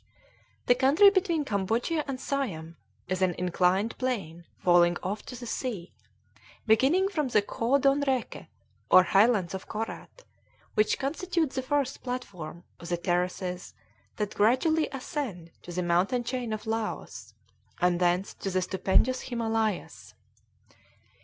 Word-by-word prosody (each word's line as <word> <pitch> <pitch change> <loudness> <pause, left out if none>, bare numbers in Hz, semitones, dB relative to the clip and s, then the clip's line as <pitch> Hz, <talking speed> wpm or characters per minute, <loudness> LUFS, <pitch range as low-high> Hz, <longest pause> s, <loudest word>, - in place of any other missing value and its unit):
The - - +6
country 285 +11 +6
between 350 -6 +1
Cambodia 225 - 0
and 270 -2 -4
Siam 190 - -3 0.3
is 185 0 -2
an 180 -2 +2
inclined 180 +4 +1
plane 190 -10 -3
falling 175 -1 +4
off 200 +3 -3
to 250 - -7
the 245 - -7
sea, 225 -7 -4 0.7
beginning 270 - +4
from 310 -8 -1
the 225 -4 +3
Khoa 240 +6 +1
Don 275 +1 +3
Rèke, 265 -4 -2 0.4
or 185 - +8
highlands 195 -2 +3
of 190 - -6
Korat, 225 - -6 0.5
which 215 0 +2
constitutes 325 +1 -1
the 260 - 0
first 275 0 -1
platform 180 -10 -6 0.2
of 170 - -9
the 175 - 0
terraces 180 +1 -2 0.4
that 210 -1 -3
gradually 260 +9 +2
ascend 250 - -5
to 175 - -10
the 180 +1 -2
mountain 180 +8 +1
chain 245 -1 -3
of 215 -1 -4
Laos, 225 0 -4 0.4
and 175 -1 +2
thence 180 +2 +1
to 195 - -5
the 185 -1 0
stupendous 195 +8 +1
Himalayas. 225 -4 -2
220 Hz, 135 wpm, -28 LUFS, 180-265 Hz, 0.7 s, or